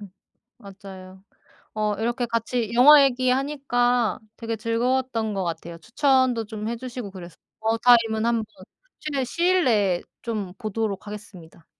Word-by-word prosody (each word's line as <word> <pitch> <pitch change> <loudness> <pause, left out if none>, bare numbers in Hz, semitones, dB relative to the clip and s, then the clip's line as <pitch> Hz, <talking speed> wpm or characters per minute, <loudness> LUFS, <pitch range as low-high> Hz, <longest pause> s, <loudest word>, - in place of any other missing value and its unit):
음 205 -3 -11 0.5
맞아요. 190 -2 -12 0.5
어 210 -1 -1
이렇게 240 +4 -1
같이 230 0 -2
영화 280 +4 +8
얘기 255 -1 +1
하니까 250 -4 0 0.2
되게 230 -1 -4
즐거웠던 230 0 -1
것 195 -2 -2
같아요. 170 0 -5
추천도 255 - +1
좀 215 0 -6
해 235 - -2
주시고 245 -4 -7
그래서 175 -3 -11 0.2
어바웃 225 +1 -1
타임은 230 -2 +4
한번 230 -2 0 0.5
최대한 280 -4 -2
시일 355 +7 +1
내에 200 -7 +2 0.2
좀 210 -6 -4
보도록 215 -3 -3
하겠습니다. 185 -6 -11
230 Hz, 315 characters per minute, -24 LUFS, 205-250 Hz, 0.5 s, 영화